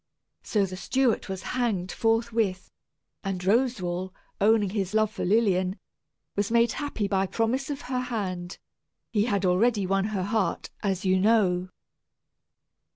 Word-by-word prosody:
So 205 -3 +1
the 185 -1 -7
steward 250 +5 +1
was 190 -2 -5
hanged 215 -8 0
forthwith, 225 -4 0 0.5
and 195 -2 -2
Roswal, 190 -3 0 0.3
owning 210 -2 +4
his 200 -1 -2
love 215 -1 +3
for - - -5
Lilian, 190 -2 +2 0.6
was 205 0 0
made 235 0 +3
happy 285 -8 -2
by 195 -1 +1
promise 240 +7 -1
of 285 -1 -4
her 255 0 -2
hand 190 -7 -4 0.5
he 210 -2 +2
had 200 -5 0
already 200 +3 +3
won 195 +1 +1
her 205 -3 -2
heart, 210 +1 -1
as 195 -2 -1
you 185 0 +3
know. 185 -4 +3
205 Hz, 140 wpm, -27 LUFS, 185-230 Hz, 0.6 s, owning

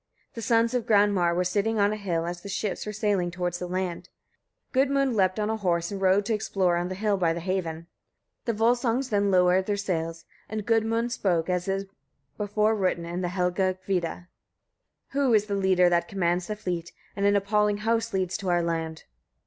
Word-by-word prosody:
The 230 - -6
sons 230 +1 +2
of 245 -2 -1
Granmar 200 -5 +3
were 180 - +2
sitting 205 +5 0
on 205 0 +3
a - - -2
hill 175 -6 -2
as 175 0 -5
the 200 - -8
ships 205 +1 -3
were - - -2
sailing 200 -4 0
towards 175 0 -3
the 180 - -4
land. 180 -1 -3 0.6
Gudmund 275 -1 +2
leapt 185 0 +2
on 210 +1 0
a 220 - -1
horse, 170 -4 0
and 195 -1 -5
rode 190 +1 +3
to 225 - 0
explore 195 -4 +1
on 175 +1 -1
the 185 - -4
hill 205 +1 0
by 170 -3 +2
the 170 - -4
haven. 170 -2 -3 0.6
The 235 - 0
Volsungs 240 +3 +1
then 200 -1 +2
lowered 185 0 +3
their 205 -1 0
sails, 165 -4 -3 0.2
and 215 -1 -4
Gudmund 225 +1 +1
spoke 180 -5 0
as 180 0 -1
is 195 0 -1 0.5
before 210 +1 +1
written 185 -5 0
in 175 +2 -4
the 180 - -1
Helgakvida: 180 -1 -1 0.8
"Who 270 -4 +2
is 210 -1 +3
the 205 - -4
leader 190 -2 +3
that 175 -1 +1
commands 180 -4 0
the 215 - -3
fleet, 180 -5 -4 0.2
and 200 0 +1
an 205 - +4
appalling 205 +1 +2
host 225 +1 0
leads 190 -1 -1
to 190 - -4
our 175 -1 +2
land?" 165 -1 -3
195 Hz, 195 wpm, -26 LUFS, 180-215 Hz, 0.8 s, an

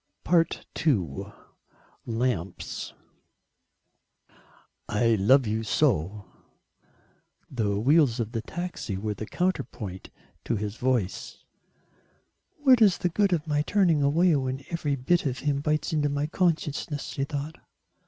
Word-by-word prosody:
II: 140 - 0 0.8
LAMPS 115 -6 -3 2.0
"I 110 +3 +2
love 120 +6 +4
you 110 +1 -1
so." 105 - 0 1.3
The 105 -5 0
wheels 135 0 +4
of 115 -1 -2
the 115 - -2
taxi 175 - -5
were 105 +2 -2
the 105 +2 -7
counterpoint 130 - -3 0.4
to - - 0
his 105 +1 -4
voice. 125 -7 -2 1.2
"What 255 -4 +6
is 200 -5 +6
the 180 - 0
good 200 +3 +2
of 165 -3 0
my 150 -2 +1
turning 170 -2 +2
away 160 +4 +4
when 135 0 -3
every 150 -4 -1
bit 145 +5 +1
of 130 -1 -2
him 145 -2 +1
bites 155 +3 0
into 150 -2 +1
my 145 +1 -1
consciousness?" 155 -3 -1
she 135 - -3
thought. 145 +2 -4
140 Hz, 120 wpm, -27 LUFS, 110-160 Hz, 2.0 s, What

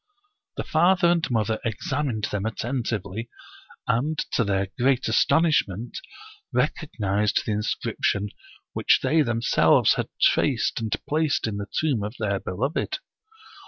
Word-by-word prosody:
The - - -2
father 175 +2 +3
and 170 -2 +1
mother 110 -2 0
examined 115 +1 -2
them 105 -1 -2
attentively, 115 -3 -3 0.6
and, 145 +7 0
to 115 - +2
their 95 -2 0
great 130 0 +2
astonishment, 115 - +2 0.5
recognized 105 - 0
the' - - -1
inscription 105 -1 -1 0.4
which - - +3
they 160 +1 +3
themselves 115 -4 +3
had - - -3
traced - - +2
and 110 -2 -1
placed 155 0 +1
in 110 -2 -3
the 100 0 -5
tomb 145 -8 +1
of 105 +4 -5
their 100 -3 -1
beloved. 120 - -2
115 Hz, 125 wpm, -25 LUFS, 105-145 Hz, 0.6 s, father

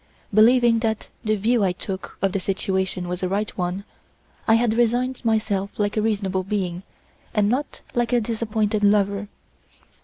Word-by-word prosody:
Believing 235 +2 +5
that 220 -1 -2
the 215 0 +1
view 220 +2 +2
I 185 -2 +2
took 190 +1 -6
of 195 - +3
the 195 - -1
situation 190 -1 -1
was 180 +1 -4
a 185 - 0
right 205 +2 -2
one, 180 +2 -2 0.6
I 225 - +6
had 230 -1 +2
resigned 245 +3 +1
myself 215 -3 0
like 205 -1 0
a 215 - +2
reasonable 200 -3 0
being, 185 -3 -2 0.5
and 210 -2 +3
not 270 +5 -2
like 240 0 0
a 245 - +4
disappointed 215 -2 -1
lover. 200 0 +2
210 Hz, 160 wpm, -23 LUFS, 195-225 Hz, 0.6 s, I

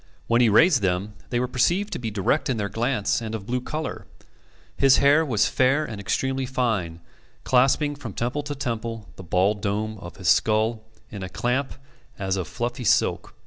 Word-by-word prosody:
When 120 +1 +3
he 120 - +5
raised 140 - +5
them, 95 +2 -1 0.2
they 120 - 0
were 125 - 0
perceived 175 +12 +1
to - - -3
be 115 -2 -3
direct 110 +9 0
in 125 - 0
their 100 -1 -2
glance 115 +1 0
and 110 -1 -4
of 100 -3 -7
blue 125 +3 -2
colour. 155 +5 -5 0.7
His 135 -1 +5
hair 145 +3 +5
was 115 -9 +1
fair 135 +4 +2
and 105 -3 -7
extremely 130 +5 -1
fine, 105 -11 -1 0.4
clasping 135 +3 +3
from 130 -8 -8
temple 120 +8 -2
to 145 0 -5
temple 115 -5 -4
the 95 - -10
bald 95 +4 +1
dome 110 +1 -2
of 85 -2 -10
his 95 -2 -5
skull 110 +5 +2 0.3
in 100 -3 -7
a 95 - -5
clamp 130 +7 -1 0.4
as 95 -1 -1
of 95 -4 -3
fluffy 120 +5 -4
silk. - - +1
115 Hz, 185 wpm, -24 LUFS, 100-130 Hz, 0.7 s, he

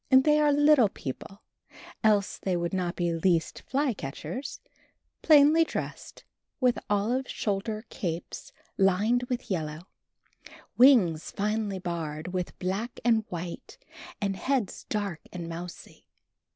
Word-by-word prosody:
They 290 +3 +5
are 300 -1 +4
little 290 -6 +5
people, 195 - -8 0.6
else 210 -2 +2
they 185 -2 -1
would 170 +1 -2
not 180 -2 -1
be 175 -1 0
least 165 -1 +1
fly 275 -1 +1
catchers, 220 - -6 0.6
plainly 305 +1 +6
dressed, - - -6 0.4
with 250 -3 +2
olive 225 +6 0
shoulder 215 +2 -2
capes 170 -2 -5 0.3
lined 200 +6 +3
with 250 -4 -3
yellow, 155 -3 -2 0.9
wings 220 - +5
finely 210 -1 -1
barred 165 -3 -4
with 180 -1 -4
black 195 +6 -3
and 225 -3 +3
white 175 0 -7 0.4
and 195 -1 -1
heads 255 -4 -2
dark 200 -6 -2
and 175 -2 -6
mousy. 170 +1 -9
200 Hz, 120 wpm, -28 LUFS, 175-245 Hz, 0.9 s, plainly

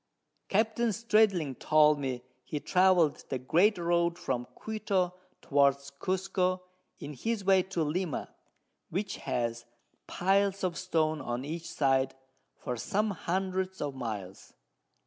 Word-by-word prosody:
Capt. 220 +3 +1 0.2
Stradling 215 - +3
told 150 +2 +4
me 130 -3 -3 0.2
he 150 - -4
travel'd 180 -3 +3
the 130 - -1
great 175 - +3
Road 170 0 +1
from 130 -8 -3
Quito 200 -5 -1 0.3
towards 140 0 +2
Cusco, 185 +3 -1 0.4
in 150 - -7
his 220 - -2
way 190 -1 +5
to 180 -3 -2
Lima, 160 0 -2 0.6
which 195 +4 -3
has 120 -1 -2 0.4
Piles 195 +1 +1
of 180 -2 0
Stone 160 -4 0
on 120 +1 -3
each 165 +3 -5
side 135 -2 +1 0.4
for 125 - -4
some 210 - 0
hundreds 190 +1 -2
of 145 -2 -2
Miles. 105 -7 -6
170 Hz, 125 wpm, -30 LUFS, 140-190 Hz, 0.6 s, way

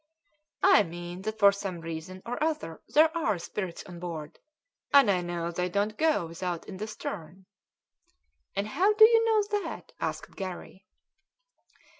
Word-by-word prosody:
"I - - +7
mean 175 0 -6
that 220 +2 -4
for 200 -2 +7
some 195 -3 -5
reason 165 +3 -7
or 245 +5 -2
other 305 - -2
there 315 +2 +4
are 310 - +1
spirits 175 +1 -5
on 175 -2 -10
board, 160 -4 -6 0.5
and 275 -7 +7
I 180 -2 +1
know 170 -1 -3
they 180 +1 -1
don't 205 +3 0
go 310 - +2
without 170 +1 -5
in 190 - -7
the 215 +3 -4
stern." 190 -4 -7 1.1
"And 200 +1 0
how 385 - +3
do 435 +1 +9
you 455 0 +4
know 425 -2 +2
that?" - - -7
asked - - -4
Garry. 185 0 -7
190 Hz, 155 wpm, -28 LUFS, 175-265 Hz, 1.1 s, do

